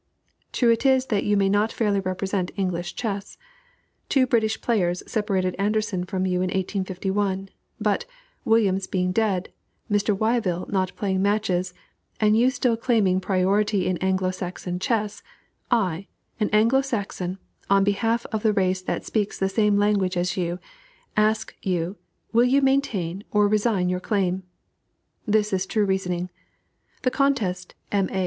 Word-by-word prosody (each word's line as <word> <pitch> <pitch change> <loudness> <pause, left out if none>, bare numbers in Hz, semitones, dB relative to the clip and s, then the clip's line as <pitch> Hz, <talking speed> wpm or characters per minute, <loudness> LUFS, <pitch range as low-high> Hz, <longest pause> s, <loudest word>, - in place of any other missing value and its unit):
True 240 -2 +3
it 230 - +1
is 265 -1 +4
that 200 - +1
you 205 0 +2
may 195 -1 +3
not 205 +3 +2
fairly 205 -3 +1
represent 190 0 -2
English 175 -3 -2
chess. 205 -4 -4 0.7
Two 265 -2 +4
British 220 -3 +1
players 180 -7 0
separated 195 -4 -1
Anderssen 205 -3 0
from 185 0 -2
you 180 -1 0
in 185 - +1
1851, 190 +1 -2 0.3
but, - - 0 0.4
Williams 195 -4 +2
being 180 -1 0
dead, 195 -3 0 0.4
Mr. 205 0 +2
Wyvill 215 -5 0
not 185 -2 -1
playing 190 -2 -1
matches, 195 -3 0 0.4
and 215 0 +4
you 240 +3 +4
still 260 -3 +1
claiming 215 -6 +2
priority 195 +1 +1
in 185 -1 0
Anglo 185 -1 +1
Saxon 180 -1 -5
chess, 210 0 -1 0.5
I, 195 -6 0 0.3
an 210 - +1
Anglo 230 +6 +4
Saxon, 195 -7 -3 0.3
on 195 0 +5
behalf 225 +4 +1
of 220 - -1
the 215 -1 +2
race 185 -2 +1
that 185 - -3
speaks 210 -2 -1
the 195 - 0
same 210 0 +2
language, 200 -3 +2 1.0
ask 215 +1 +1
you, 180 0 -1 0.4
will 235 +2 +5
you 270 +3 +3
maintain 205 -10 0
or 210 -1 +3
resign 210 -3 +1
your 180 0 0
claim?" 190 -2 0 0.9
This 210 -1 +2
is 190 0 0
true 215 -3 +1
reasoning. 180 -2 -1 0.7
The 255 - +2
contest, 205 -11 0 0.2
"M. 195 -2 +1
A." 190 - -1
200 Hz, 145 wpm, -24 LUFS, 185-220 Hz, 1.0 s, on